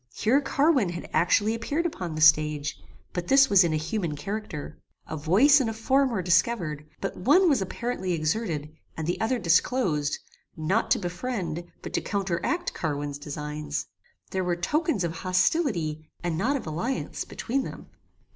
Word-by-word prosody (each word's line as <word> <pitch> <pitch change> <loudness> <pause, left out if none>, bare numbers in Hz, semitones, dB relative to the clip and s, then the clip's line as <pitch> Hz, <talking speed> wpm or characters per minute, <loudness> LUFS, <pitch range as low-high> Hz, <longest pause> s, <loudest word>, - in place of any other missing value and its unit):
Here 255 +6 +3
Carwin 275 - +2
had 175 0 -6
actually 205 +5 +3
appeared 285 +9 -2
upon 180 - -3
the 155 - -3
stage; 150 -1 +3 0.3
but 175 -1 -3
this 270 0 +5
was 195 -2 +7
in 170 - +1
a - - +1
human 165 0 -2
character. 195 -2 -5 0.3
A - - -5
voice 210 - +5
and 235 - 0
a - - -3
form 265 +5 +2
were 205 -7 -2
discovered; 170 -4 +1
but - - -3
one 330 - +4
was 280 -10 +3
apparently 190 -2 -2
exerted, 155 -2 -2 0.2
and 160 - -3
the 175 - -2
other 245 +3 +1
disclosed, 170 - +1 0.4
not 175 +8 0
to - - +4
befriend, 175 -3 -3 0.2
but - - -7
to - - +1
counteract 200 - -1
Carwin's 145 -2 -3
designs. 150 - -4 0.5
There 190 -1 -1
were 175 -1 0
tokens 300 - 0
of 165 -1 -3
hostility, 180 - 0
and 175 -2 -1
not 235 - +1
of 275 - -4
alliance, 175 +12 -3
between 265 +3 -2
them. - - -8
180 Hz, 165 wpm, -26 LUFS, 155-240 Hz, 0.5 s, was